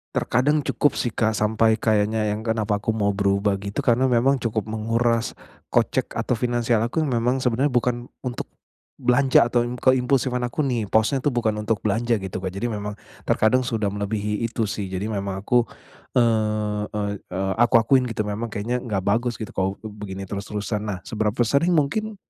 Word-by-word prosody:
terkadang 145 Hz, +6 st, +2 dB
cukup 145 Hz, -, +1 dB
sih, 120 Hz, -, 0 dB
Kak, 110 Hz, +1 st, +1 dB
sampai 110 Hz, +1 st, +2 dB
kayaknya 110 Hz, 0 st, +1 dB
yang 105 Hz, +1 st, -3 dB
kenapa 110 Hz, -2 st, 0 dB
aku 110 Hz, -, -1 dB
mau 105 Hz, -2 st, +1 dB
berubah, 100 Hz, 0 st, +1 dB
gitu, 100 Hz, 0 st, -5 dB
karena 125 Hz, +2 st, +3 dB
memang 130 Hz, +4 st, +4 dB
cukup 110 Hz, -2 st, -1 dB
menguras 115 Hz, +1 st, 0 dB, 0.4 s
kocek -, -, +1 dB
atau 125 Hz, -, 0 dB
finansial 120 Hz, -1 st, +1 dB
aku 120 Hz, +7 st, -1 dB
yang -, -, -1 dB
memang 120 Hz, +2 st, +1 dB
sebenarnya 130 Hz, +3 st, +1 dB
bukan 120 Hz, 0 st, 0 dB, 0.2 s
untuk 125 Hz, -1 st, -3 dB, 0.6 s
belanja 130 Hz, +2 st, +4 dB
atau 120 Hz, 0 st, +2 dB
yang 125 Hz, -, -4 dB
keimpulsifan 130 Hz, -1 st, +2 dB
aku 135 Hz, +6 st, -2 dB
nih, 120 Hz, -4 st, 0 dB
posnya 110 Hz, +5 st, +3 dB
itu 145 Hz, -, +2 dB
bukan 110 Hz, -3 st, +1 dB
untuk 110 Hz, -1 st, 0 dB
belanja, 115 Hz, +1 st, +1 dB
gitu, 95 Hz, -1 st, -5 dB
Kak. 95 Hz, -, -2 dB
Jadi 105 Hz, +5 st, -2 dB
memang 105 Hz, 0 st, -4 dB, 0.4 s
terkadang 125 Hz, +4 st, +3 dB
sudah 110 Hz, -3 st, -1 dB
melebihi 105 Hz, +1 st, -2 dB
itu 115 Hz, 0 st, -2 dB
sih. 100 Hz, -1 st, -3 dB
Jadi 95 Hz, +3 st, -3 dB
memang 100 Hz, -1 st, -3 dB
aku, 120 Hz, +3 st, +3 dB, 0.5 s
eee, 110 Hz, -3 st, +1 dB
ey 100 Hz, -1 st, -2 dB
eee, 95 Hz, +1 st, -3 dB
aku 120 Hz, +1 st, +3 dB
akuin 130 Hz, +2 st, +3 dB
gitu 115 Hz, -3 st, -2 dB
memang 110 Hz, +2 st, -3 dB
kayaknya 120 Hz, +5 st, -2 dB
enggak 105 Hz, -5 st, -1 dB
bagus, 115 Hz, +4 st, +1 dB
gitu, 110 Hz, -, -6 dB
kalau 95 Hz, +1 st, 0 dB
b 110 Hz, -, -6 dB
begini 100 Hz, -2 st, -7 dB
terus-terusan. 105 Hz, +1 st, -3 dB
Nah, 100 Hz, -3 st, -3 dB
seberapa 110 Hz, +1 st, -2 dB
sering, 165 Hz, +7 st, +2 dB
mungkin 205 Hz, +9 st, 0 dB
110 Hz, 180 wpm, -23 LUFS, 105-120 Hz, 0.6 s, memang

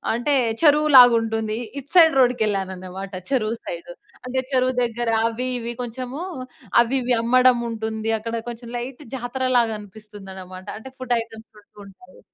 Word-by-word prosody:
అంటే, 280 Hz, +5 st, +1 dB, 0.3 s
చెరువులాగా 290 Hz, -5 st, +7 dB
ఉంటుంది. 225 Hz, -1 st, -2 dB, 0.2 s
ఇటు 280 Hz, +1 st, -8 dB
సైడ్ 325 Hz, -2 st, +7 dB
రోడ్డుకెళ్ళాననమాట 195 Hz, -6 st, -1 dB, 0.2 s
చెరువు 230 Hz, -3 st, 0 dB
సైడ్. 170 Hz, 0 st, -7 dB, 0.3 s
అంటే, 260 Hz, +1 st, -2 dB
చెరువు 255 Hz, 0 st, +1 dB
దగ్గర 235 Hz, 0 st, -2 dB, 0.2 s
అవి 250 Hz, +3 st, -3 dB
ఇవి 235 Hz, +1 st, -5 dB
కొంచెము 255 Hz, +5 st, -6 dB, 0.6 s
అవి 240 Hz, +3 st, +2 dB
ఇవి 245 Hz, +1 st, +1 dB
అమ్మడం 255 Hz, +1 st, +4 dB
ఉంటుంది. 220 Hz, -1 st, -4 dB
అక్కడ 230 Hz, +1 st, -5 dB
కొంచెం 235 Hz, 0 st, -9 dB
లైట్ 250 Hz, +4 st, -7 dB
జాతరలాగా 245 Hz, -2 st, 0 dB
అనిపిస్తుందనమాట. 195 Hz, -3 st, -11 dB
అంటే 265 Hz, +4 st, -10 dB
ఫుడ్ 255 Hz, -1 st, -1 dB
ఐటెమ్స్ 225 Hz, -1 st, -12 dB
ఉంటూ 205 Hz, -, -33 dB
ఉంటాయి. 185 Hz, -1 st, -17 dB
235 Hz, 135 wpm, -22 LUFS, 215-255 Hz, 0.6 s, చెరువులాగా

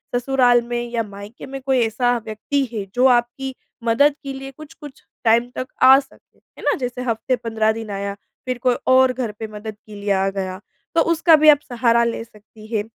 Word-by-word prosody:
ससुराल 245 Hz, -1 st, +3 dB
में 240 Hz, 0 st, -1 dB
या 235 Hz, -1 st, 0 dB
मायके 205 Hz, +2 st, -10 dB
में 270 Hz, 0 st, -7 dB
कोई 265 Hz, -2 st, +2 dB
ऐसा 245 Hz, +2 st, +1 dB
व्यक्ति 220 Hz, +6 st, -2 dB
है 210 Hz, -3 st, -3 dB
जो 250 Hz, +1 st, +3 dB
आपकी 250 Hz, +2 st, +1 dB, 0.3 s
मदद 280 Hz, +6 st, +3 dB
के 275 Hz, -1 st, -5 dB
लिए 270 Hz, 0 st, -8 dB
कुछ-कुछ 295 Hz, -1 st, -13 dB, 0.2 s
टाइम 235 Hz, +1 st, +3 dB
तक 255 Hz, -, -4 dB, 0.2 s
आ 265 Hz, +1 st, +9 dB
सके, 275 Hz, -1 st, -16 dB
है -, -, -19 dB
ना? -, -, +2 dB
जैसे 250 Hz, -1 st, -4 dB
हफ़्ते 250 Hz, +1 st, -1 dB
15 225 Hz, -2 st, 0 dB
दिन 225 Hz, -1 st, -6 dB
आया, 200 Hz, 0 st, -3 dB, 0.3 s
फ़िर 255 Hz, -1 st, -2 dB
कोई 250 Hz, -1 st, +3 dB
और 260 Hz, 0 st, +5 dB
घर 245 Hz, -3 st, -3 dB
पर 220 Hz, -, -5 dB
मदद 210 Hz, +1 st, -7 dB
के 215 Hz, -, -11 dB
लिए 205 Hz, 0 st, -3 dB
आ 195 Hz, 0 st, +1 dB
गया, 190 Hz, -1 st, -4 dB, 0.4 s
तो 330 Hz, -, +5 dB
उसका 335 Hz, 0 st, +4 dB
भी 310 Hz, 0 st, +6 dB
आप 290 Hz, -2 st, +7 dB
सहारा 235 Hz, -1 st, +2 dB
ले 230 Hz, -1 st, -2 dB
सकती 215 Hz, -1 st, -17 dB
हैं। 210 Hz, -, +1 dB
240 Hz, 205 wpm, -21 LUFS, 220-265 Hz, 0.4 s, आ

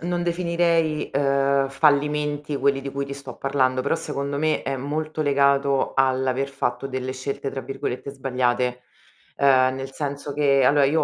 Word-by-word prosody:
non 175 Hz, 0 st, -1 dB
definirei, 170 Hz, -2 st, 0 dB
ehm, 140 Hz, 0 st, +2 dB
fallimenti 150 Hz, +1 st, +1 dB
quelli 140 Hz, 0 st, +1 dB
di 135 Hz, -, -5 dB
cui 140 Hz, 0 st, -3 dB
ti 140 Hz, -, -7 dB
sto 135 Hz, -3 st, -9 dB
parlando 130 Hz, -2 st, +1 dB
però -, -, +1 dB
secondo 140 Hz, +1 st, -3 dB
me 155 Hz, +1 st, +1 dB
è 135 Hz, 0 st, -2 dB
molto 155 Hz, +3 st, -3 dB
legato 140 Hz, -1 st, +2 dB
all'aver 130 Hz, 0 st, +1 dB
fatto 130 Hz, -1 st, -2 dB
delle 130 Hz, -1 st, -4 dB
scelte, 135 Hz, +1 st, -4 dB
tra 135 Hz, -, -5 dB
virgolette, 135 Hz, 0 st, -5 dB
"sbagliate", 125 Hz, -2 st, -1 dB, 0.5 s
ehm, 130 Hz, -2 st, +4 dB
nel 135 Hz, 0 st, -6 dB
senso 145 Hz, 0 st, -4 dB
che 140 Hz, -2 st, +3 dB
allora, 140 Hz, +2 st, +5 dB
uhm, 140 Hz, -, +1 dB
140 Hz, 160 wpm, -23 LUFS, 135-145 Hz, 0.5 s, allora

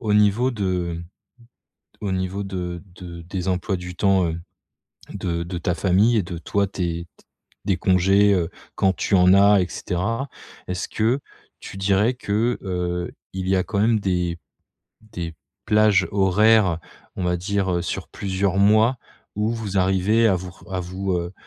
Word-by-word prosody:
au 105 Hz, -3 st, 0 dB
niveau 105 Hz, +5 st, +3 dB
de 90 Hz, -6 st, -2 dB, 1.0 s
au 100 Hz, -2 st, -2 dB
niveau 95 Hz, +2 st, -2 dB
de 90 Hz, -3 st, -5 dB
de 85 Hz, -2 st, -9 dB
des 90 Hz, +2 st, -4 dB
emplois 95 Hz, +1 st, 0 dB
du 90 Hz, 0 st, -7 dB
temps, 95 Hz, -2 st, +3 dB
heu, 80 Hz, +1 st, -4 dB, 0.7 s
de 85 Hz, -2 st, -2 dB
de 85 Hz, +1 st, -5 dB
ta 90 Hz, +1 st, 0 dB
famille 95 Hz, +7 st, +3 dB
et 105 Hz, -, +2 dB
de 85 Hz, 0 st, -6 dB
toi, 100 Hz, +5 st, 0 dB
tes, 85 Hz, -3 st, -3 dB
t -, -, -24 dB, 0.4 s
des 95 Hz, -3 st, +1 dB
congés, 95 Hz, +1 st, +4 dB, 0.3 s
quand 95 Hz, -1 st, +2 dB
tu 100 Hz, -, +1 dB
en 90 Hz, 0 st, +6 dB
as 100 Hz, +1 st, +6 dB
et 90 Hz, -, -1 dB
cetera. 115 Hz, +10 st, -2 dB, 0.4 s
Est-ce 90 Hz, -1 st, -3 dB
que 115 Hz, +5 st, +1 dB, 0.4 s
tu -, -, -10 dB
dirais 100 Hz, +4 st, +2 dB
que, 115 Hz, +1 st, 0 dB
heu, 90 Hz, -2 st, -2 dB, 0.2 s
il 95 Hz, 0 st, -4 dB
y 95 Hz, -, +3 dB
a 90 Hz, -, +1 dB
quand 100 Hz, -, -2 dB
même 110 Hz, +1 st, +3 dB
des 90 Hz, -3 st, -1 dB, 0.6 s
des 85 Hz, -7 st, -7 dB, 0.3 s
plages 105 Hz, -3 st, +4 dB
horaires, 100 Hz, -2 st, +4 dB, 0.4 s
on 95 Hz, -, -3 dB
va 90 Hz, 0 st, +1 dB
dire, 95 Hz, +1 st, -1 dB
heu, 85 Hz, -, 0 dB
sur 85 Hz, -, -4 dB
plusieurs 95 Hz, -1 st, -1 dB
mois, 110 Hz, +5 st, +4 dB, 0.4 s
où 105 Hz, +1 st, 0 dB
vous 110 Hz, -4 st, -3 dB
arrivez 95 Hz, +5 st, +3 dB
à 100 Hz, -, +3 dB
vous 90 Hz, 0 st, -5 dB
r -, -, -19 dB
à 90 Hz, -, -1 dB
vous, 95 Hz, +2 st, -3 dB
heu, 85 Hz, +1 st, -2 dB
95 Hz, 170 wpm, -23 LUFS, 90-105 Hz, 1.0 s, en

